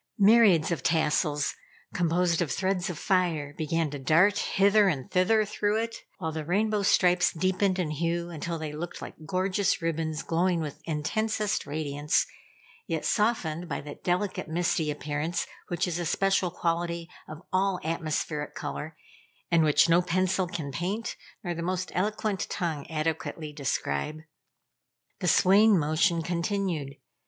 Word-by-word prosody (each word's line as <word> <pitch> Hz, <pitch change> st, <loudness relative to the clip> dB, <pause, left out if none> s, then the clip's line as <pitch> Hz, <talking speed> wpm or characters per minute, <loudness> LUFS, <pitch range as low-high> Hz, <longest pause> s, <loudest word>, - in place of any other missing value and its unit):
Myriads 200 Hz, -6 st, +5 dB
of 170 Hz, -, -1 dB
tassels, 150 Hz, -2 st, +1 dB, 0.4 s
composed 175 Hz, 0 st, +1 dB
of 160 Hz, -6 st, -1 dB
threads 190 Hz, +1 st, 0 dB
of 175 Hz, -, -5 dB
fire, 170 Hz, -7 st, 0 dB
began 160 Hz, -1 st, -1 dB
to 145 Hz, -, -5 dB
dart 165 Hz, +9 st, +4 dB
hither 200 Hz, +1 st, +4 dB
and 140 Hz, -8 st, -2 dB
thither 210 Hz, +4 st, +3 dB
through 210 Hz, +1 st, 0 dB
it, 230 Hz, 0 st, -3 dB, 0.2 s
while 160 Hz, -5 st, -3 dB
the 155 Hz, 0 st, -4 dB
rainbow 210 Hz, +6 st, +1 dB
stripes 180 Hz, -2 st, +4 dB
deepened 185 Hz, +2 st, +1 dB
in 170 Hz, -5 st, -1 dB
hue 170 Hz, +3 st, -2 dB
until 165 Hz, +1 st, -4 dB
they 155 Hz, -2 st, -5 dB
looked 165 Hz, +3 st, -6 dB
like -, -, -7 dB
gorgeous 185 Hz, +1 st, +1 dB
ribbons 160 Hz, -2 st, -2 dB
glowing 175 Hz, +1 st, +1 dB
with 150 Hz, -3 st, -5 dB
intensest 210 Hz, +6 st, -1 dB
radiance, 145 Hz, 0 st, 0 dB, 0.6 s
yet 160 Hz, -2 st, -2 dB
softened 180 Hz, -6 st, 0 dB
by -, -, -2 dB
that 145 Hz, 0 st, -10 dB
delicate 185 Hz, +2 st, -1 dB
misty 160 Hz, -1 st, 0 dB
appearance 150 Hz, +3 st, -2 dB, 0.2 s
which 175 Hz, +1 st, -1 dB
is 175 Hz, -1 st, -2 dB
a 175 Hz, -, -2 dB
special 195 Hz, +1 st, +2 dB
quality 170 Hz, 0 st, -2 dB, 0.2 s
of 155 Hz, +3 st, -9 dB
all 190 Hz, 0 st, +2 dB
atmospheric 155 Hz, -2 st, -2 dB
color, 155 Hz, +1 st, -5 dB, 0.5 s
and 170 Hz, -1 st, +5 dB
which 155 Hz, +2 st, +5 dB
no 170 Hz, +1 st, +5 dB
pencil 185 Hz, +1 st, +1 dB
can 155 Hz, -5 st, -5 dB
paint, 190 Hz, -, -3 dB, 0.3 s
nor 175 Hz, -2 st, -2 dB
the 170 Hz, -, -5 dB
most 185 Hz, +1 st, -2 dB
eloquent 210 Hz, +1 st, -1 dB
tongue 160 Hz, -5 st, -3 dB
adequately 155 Hz, -1 st, -3 dB
describe. 140 Hz, -, -2 dB, 1.0 s
The 185 Hz, -, -2 dB
swaying 200 Hz, +4 st, +6 dB
motion 165 Hz, +2 st, +2 dB
continued. 170 Hz, -4 st, -2 dB
170 Hz, 145 wpm, -28 LUFS, 155-185 Hz, 1.0 s, swaying